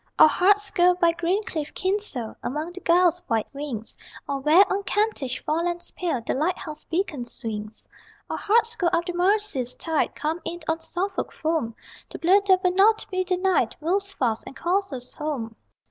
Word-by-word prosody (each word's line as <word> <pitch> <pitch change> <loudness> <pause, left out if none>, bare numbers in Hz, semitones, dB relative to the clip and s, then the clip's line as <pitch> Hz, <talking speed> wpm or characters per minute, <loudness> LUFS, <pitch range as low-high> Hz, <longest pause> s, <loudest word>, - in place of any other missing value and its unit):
_ - - -43
Our - - +9
hearts 405 +5 +3
go 360 0 +4
by 340 -1 +3
green 345 +5 0
cliffed 310 -6 -5
Kinsale 375 - -2
Among 305 +6 -3
the 365 - -8
gulls' 350 0 +3
white 225 -3 +1
wings, 275 -6 -5 0.3
Or 280 -1 -2
where, 310 +8 +6
on 395 - -1
Kentish 400 - -1
forelands 345 +3 -1
pale 325 -10 -2
The - - 0
lighthouse 310 0 -2
beacon 330 -7 -2
swings: 220 -3 -6 0.4
Our - - -3
hearts 460 +2 +2
go 360 - 0
up 340 0 +1
the 355 - -3
Mersey's 355 - +1
tide, 320 -2 -1
Come 315 +4 -2
in 345 +1 -4
on 320 0 0
Suffolk 375 +4 -3
foam 310 -8 -2 0.3
The - - -7
blood 390 +4 +3
that 375 -1 +4
will 365 - +3
not 430 +4 +4
be 370 0 0
denied 365 - +1
Moves 390 +6 0
fast, 230 -4 0
and - - -9
calls 385 +4 0
us 250 -2 -7
home! 265 -7 -4
340 Hz, 180 wpm, -25 LUFS, 285-375 Hz, 0.4 s, Our